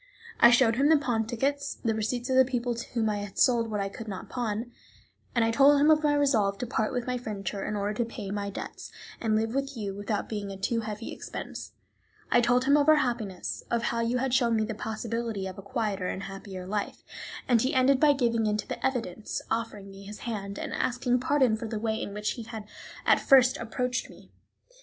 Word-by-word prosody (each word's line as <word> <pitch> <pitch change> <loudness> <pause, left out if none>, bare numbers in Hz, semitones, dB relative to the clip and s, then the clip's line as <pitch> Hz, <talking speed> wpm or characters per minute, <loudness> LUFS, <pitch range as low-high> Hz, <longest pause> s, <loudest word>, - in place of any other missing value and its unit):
I 235 - +9
showed 240 -1 +4
him 280 +3 +4
the 320 - +7
pawn 235 -6 0
tickets, 280 +4 -1
the 225 -2 -1
receipts 230 +3 -2
of - - +2
the 260 - +8
people 245 -1 -1
to 235 0 -7
whom 230 -2 +1
I 210 -1 0
had 205 -1 -7
sold 235 -2 +3
what 210 -1 -2
I 195 - 0
could 220 +3 -8
not 190 -3 -6
pawn; 235 -1 -3 0.6
I 230 -1 +3
told 280 +4 +6
him 300 +2 +6
of 310 0 +5
my 295 -1 +3
resolve 220 -9 +2
to 245 - -3
part 220 -2 -1
with 245 -2 -2
my 250 -1 -2
furniture 200 -4 -4
in 210 - -2
order 205 +1 -1
to 235 +2 -1
pay 215 -4 -6
my 200 0 -2
debts, 200 - -7 0.3
and 220 -2 +1
live 225 +1 0
with 275 -1 -2
you 200 -3 -3
without 205 +1 -2
being 205 -2 -4
a 195 - -6
too 230 +4 0
heavy 215 0 -5
expense. - - -7 0.6
I 240 - +5
told 245 +1 +3
him 280 +2 +5
of 290 +1 +3
our 310 - +8
happiness, 235 -10 -2
of 235 -1 0
how 230 - 0
you 230 +2 +1
had 260 0 -1
shown 240 -3 +3
me 220 -1 +1
the 220 - -4
possibility 220 -1 -3
of 190 +1 -6
a - - -6
quieter 200 -3 -2
and 190 - -4
happier 195 -1 -7
life, 205 +2 -3 0.4
and 240 -3 +4
he 260 - 0
ended 260 +1 +4
by 295 -1 +6
giving 230 -5 +1
in 210 0 +1
to - - -5
the - - -5
evidence, 230 -6 -2
offering 215 -3 -3
me 195 0 -12
his 210 +1 -9
hand, 200 -4 -4
and - - -4
asking 250 0 +1
pardon 260 -3 +3
for 220 +1 -5
the 220 0 -3
way 220 0 -1
in - - -4
which 210 +1 -2
he 240 - -6
had 225 -1 -7 0.4
at - - +5
first 260 -2 +6
approached 245 +2 -2
me. - - -16
230 Hz, 230 wpm, -28 LUFS, 210-250 Hz, 0.6 s, I